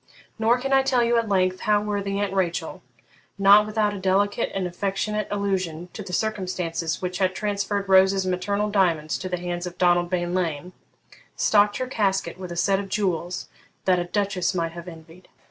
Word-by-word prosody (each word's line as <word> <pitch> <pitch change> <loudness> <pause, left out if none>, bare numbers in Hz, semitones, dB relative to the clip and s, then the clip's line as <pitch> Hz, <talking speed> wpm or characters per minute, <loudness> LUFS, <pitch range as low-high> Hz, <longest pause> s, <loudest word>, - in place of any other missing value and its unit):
Nor 225 +2 +3
can 270 +2 -2
I 270 - +6
tell 260 -2 +2
you 235 0 +2
at 230 -2 -3
length 185 -1 +1
how 210 -2 +2
worthy 200 -1 -2
Aunt 200 -1 -1
Rachel, 180 -3 -2 0.6
not 200 +2 +6
without 215 -1 0
a 200 - -5
delicate 195 +2 +1
and 190 -1 -1
affectionate 195 +3 -2
allusion 185 -4 -2
to - - -7
the 190 - -8
circumstances 180 -5 -2
which 180 0 -3
had 185 -1 +1
transferred 200 -1 -2
Rose's 190 0 +4
maternal 200 +3 -1
diamonds 165 -6 +1
to 185 - -5
the 180 - -1
hands 175 0 -4
of 180 0 -9
Donald 175 -1 +3
Bean 175 -1 -1
Lean, 180 -1 -2 0.6
stocked 205 -1 +3
her 255 - -2
casket 195 -7 -1
with 180 -2 -7
a 170 - -6
set 195 +3 +2
of 200 -1 -6
jewels 180 -3 -2 0.4
that 185 -1 +3
a 175 - -2
duchess 195 -1 -1
might 165 -2 -1
have 170 +1 -9
envied. 165 +1 -13
190 Hz, 185 wpm, -24 LUFS, 180-205 Hz, 0.6 s, I